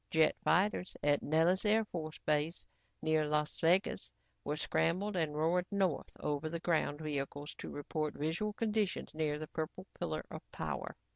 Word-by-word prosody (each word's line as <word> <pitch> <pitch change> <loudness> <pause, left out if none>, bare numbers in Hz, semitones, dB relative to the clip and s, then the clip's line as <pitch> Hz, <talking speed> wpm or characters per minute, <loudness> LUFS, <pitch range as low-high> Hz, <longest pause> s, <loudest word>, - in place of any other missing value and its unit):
Jet 160 -1 +4
fighters 185 +1 +2
at 145 0 +4
Nellis 165 +5 +3
Air 220 +1 +4
Force 160 -5 -5
base 155 +2 +1 0.4
near 155 -1 +3
Las 150 0 0
Vegas, 180 +4 +2 0.3
were 150 - -1
scrambled 185 +6 +1
and 160 -4 0
roared 175 +4 +2
north 195 -6 0
over 150 +1 -1
the 170 +1 -3
ground 160 -3 +1
vehicles 145 -1 -3
to - - -5
report 150 +1 -3
visual 160 +8 -1
conditions 210 -4 0
near 155 -1 0
the 155 0 -6
purple 170 +3 -4
pillar - - -2
of - - -6
power. - - -4
160 Hz, 155 wpm, -35 LUFS, 150-185 Hz, 0.4 s, Jet